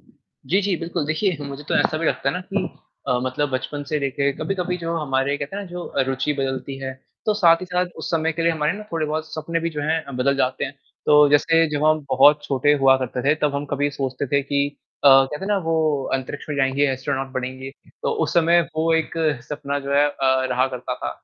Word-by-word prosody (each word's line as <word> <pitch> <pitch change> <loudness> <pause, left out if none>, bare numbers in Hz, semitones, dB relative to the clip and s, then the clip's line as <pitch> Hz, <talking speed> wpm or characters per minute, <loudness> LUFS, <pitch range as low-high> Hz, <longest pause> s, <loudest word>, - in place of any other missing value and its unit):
जी, 175 - -4
जी, 195 -2 0
बिल्कुल, 165 -1 -3
देखिए 165 +3 0
मुझे 140 +1 -7
तो - - 0
ऐसा 155 - +1
भी 165 - -1
लगता - - 0
है - - -1
ना 180 - -2
कि 195 -2 +1 0.4
अ, 125 - +2
मतलब 135 +3 -1
बचपन 140 +3 -3
से 150 - 0
लेकर 140 0 0
कभी-कभी 180 -2 -2
जो 165 0 -3
हमारे 140 -2 0
कहते 145 +8 -5
हैं 205 - -3
ना 195 - -10
जो 175 0 -7
रुचि 135 +2 0
बदलती 135 0 -3
है, 135 -1 -4 0.3
तो 215 - +3
साथ 170 -5 +5
ही 185 - -6
साथ 180 0 0
उस - - -5
समय 160 -1 +1
के 165 +1 -3
लिए 170 - +3
हमारे 150 -1 0
ना 205 +2 -7
थोड़े-बहुत 155 -1 -1
सपने 165 +1 -2
भी 165 0 -2
जो 150 -2 -4
हैं 160 +2 0
अ, 140 - -9
बदल 130 +2 +1
जाते 130 -1 0
हैं। 135 - -5 0.3
तो 150 -1 +7
जैसे 165 +3 +4
जब 150 0 -1
हम 155 -1 +3
बहुत 150 0 +6
छोटे 140 +1 +2
हुआ 135 0 +7
करते 125 -1 -3
थे, 150 - +5
तब 150 -2 -1
हम 140 +1 -2
कभी 145 +1 +1
सोचते 135 0 -3
थे 140 +1 +1
कि 140 0 0 0.4
अ, - - +9
कहते 135 +5 +5
हैं - - -5
ना 205 - +2
वो 155 -4 +1
अंतरिक्ष 135 +3 -5
में 145 - -3
जाएँगे, 135 +1 +2
एस्ट्रोनॉट 130 +1 -3
बनेंगे, 130 +1 -5 0.3
तो - - 0
उस - - -4
समय 170 0 +5 0.2
वो 165 +1 +2
एक 160 -1 0 0.4
सपना 145 -1 -3
जो - - -3
है 145 +1 +5
अ, 130 -2 +1
रहा 130 +2 +2
करता 125 +1 -4
था। - - -4
145 Hz, 235 wpm, -22 LUFS, 135-165 Hz, 0.4 s, अ